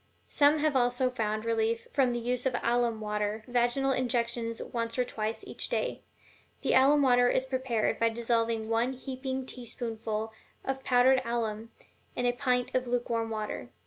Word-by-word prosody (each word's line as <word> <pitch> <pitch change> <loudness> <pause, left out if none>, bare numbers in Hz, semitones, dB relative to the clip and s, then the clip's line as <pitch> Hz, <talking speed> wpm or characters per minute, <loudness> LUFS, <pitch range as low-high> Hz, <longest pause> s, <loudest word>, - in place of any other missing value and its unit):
Some 290 +1 +4
have 305 -1 +1
also 245 0 +2
found 215 -2 -2
relief 230 0 0
from 260 -3 +3
the 240 - -1
use 250 +2 0
of 255 - -1
alum 235 -2 +1
water 210 0 -2
vaginal 245 +2 +1
injections 235 -2 -1
once 230 0 -3
or 250 - +3
twice 220 -2 -4
each - - -4
day. - - -1 0.6
The - - +2
alum 285 +2 +5
water 245 -2 +5
is 260 - +1
prepared 260 -4 -1
by 230 - +3
dissolving 230 -1 0
one 230 +3 +1
heaping 260 0 -4
teaspoonful 225 -3 -5 0.3
of 265 0 -3
powdered 255 +1 +4
alum 230 -2 -2 0.5
in 245 - -1
a 245 - +4
pint 250 -1 0
of 255 -1 0
lukewarm 235 -2 -1
water. 215 - -4
240 Hz, 160 wpm, -29 LUFS, 225-255 Hz, 0.6 s, alum